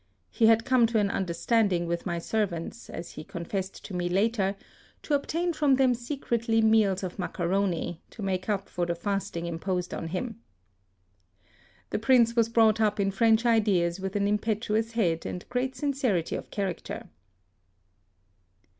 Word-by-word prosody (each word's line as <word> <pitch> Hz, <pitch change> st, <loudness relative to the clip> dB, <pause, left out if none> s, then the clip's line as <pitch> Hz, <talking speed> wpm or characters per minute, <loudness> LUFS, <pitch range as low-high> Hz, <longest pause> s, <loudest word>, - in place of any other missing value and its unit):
He 225 Hz, -, +3 dB
had 225 Hz, 0 st, +4 dB
come 255 Hz, -3 st, +4 dB
to 230 Hz, 0 st, 0 dB
an 205 Hz, -2 st, +2 dB
understand 195 Hz, +4 st, +1 dB
ing 175 Hz, -1 st, 0 dB
with 170 Hz, +2 st, -3 dB
my 170 Hz, -1 st, -1 dB
servants, 200 Hz, +2 st, -3 dB
as 170 Hz, -, -7 dB
he 155 Hz, -, -8 dB
confessed 185 Hz, +4 st, -5 dB
to 200 Hz, -, -8 dB
me 175 Hz, -1 st, -1 dB
later, 200 Hz, +1 st, +1 dB, 0.5 s
to 300 Hz, -, -2 dB
obtain 335 Hz, +5 st, 0 dB
fi'om 290 Hz, -4 st, +3 dB
them 260 Hz, -2 st, +4 dB
secretly 235 Hz, -2 st, -1 dB
meals 220 Hz, -4 st, +3 dB
of 185 Hz, +1 st, -5 dB
macaroni, 180 Hz, -1 st, -1 dB
to 215 Hz, -, -9 dB
make 185 Hz, 0 st, -2 dB
up 200 Hz, -2 st, -1 dB
for 175 Hz, -2 st, -2 dB
the 170 Hz, -, -1 dB
fasting 190 Hz, -2 st, -3 dB
im 170 Hz, -1 st, -4 dB
posed 180 Hz, -1 st, -2 dB
qn 165 Hz, -, -4 dB
him. 225 Hz, +6 st, -4 dB, 1.5 s
The -, -, 0 dB
Prince 235 Hz, 0 st, +4 dB
was 230 Hz, -1 st, +3 dB
brought 225 Hz, -1 st, +4 dB
up 210 Hz, -1 st, +2 dB
in 195 Hz, 0 st, +2 dB
French 225 Hz, +3 st, +3 dB
ideas 200 Hz, -7 st, +2 dB
with 190 Hz, +1 st, -4 dB
an 200 Hz, 0 st, +2 dB
impetuous 215 Hz, +2 st, 0 dB
head 170 Hz, -8 st, +1 dB
and 180 Hz, -, -6 dB
great 255 Hz, +1 st, -1 dB
sincerity 255 Hz, -, 0 dB
of -, -, -6 dB
character. 195 Hz, -4 st, -4 dB
205 Hz, 165 wpm, -28 LUFS, 180-230 Hz, 1.5 s, had